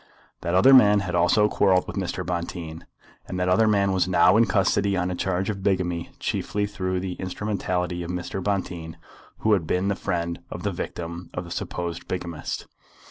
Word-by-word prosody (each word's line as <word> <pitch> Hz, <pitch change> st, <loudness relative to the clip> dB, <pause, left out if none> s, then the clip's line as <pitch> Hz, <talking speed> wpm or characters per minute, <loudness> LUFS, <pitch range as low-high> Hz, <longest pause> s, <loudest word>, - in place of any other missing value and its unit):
That 85 Hz, +1 st, -1 dB
other 130 Hz, +9 st, +7 dB
man 105 Hz, -5 st, +7 dB
had 90 Hz, -2 st, -4 dB
also 90 Hz, +5 st, +4 dB
quarrelled 95 Hz, -3 st, +3 dB
with -, -, -7 dB
Mr. 90 Hz, -2 st, -3 dB
Bonteen, 85 Hz, -2 st, -5 dB, 0.4 s
and 90 Hz, -, -4 dB
that 90 Hz, -, 0 dB
other 95 Hz, +5 st, +4 dB
man 100 Hz, -2 st, +3 dB
was 95 Hz, -1 st, +1 dB
now 90 Hz, +1 st, +5 dB
in 115 Hz, +1 st, +5 dB
custody 100 Hz, 0 st, +2 dB
on 90 Hz, 0 st, 0 dB
a -, -, -2 dB
charge 95 Hz, +1 st, -1 dB
of 100 Hz, -2 st, -6 dB
bigamy 90 Hz, -3 st, 0 dB
chiefly 105 Hz, 0 st, -1 dB
through 95 Hz, -3 st, -2 dB
the 90 Hz, 0 st, -3 dB
instrumentality 90 Hz, -2 st, -2 dB
of 85 Hz, -, -5 dB
Mr. 90 Hz, +1 st, -4 dB
Bonteen, 90 Hz, -5 st, -3 dB, 0.4 s
who 110 Hz, -, +3 dB
had 90 Hz, -6 st, +1 dB
been 95 Hz, +2 st, +1 dB
the 100 Hz, -, +1 dB
friend 85 Hz, -2 st, -2 dB
of 90 Hz, -, -7 dB
the 100 Hz, -, 0 dB
victim 85 Hz, 0 st, -6 dB
of 90 Hz, -, -3 dB
the 85 Hz, -, -11 dB
supposed 85 Hz, -1 st, -4 dB
bigamist. 85 Hz, -4 st, -4 dB
90 Hz, 190 wpm, -25 LUFS, 85-100 Hz, 0.4 s, other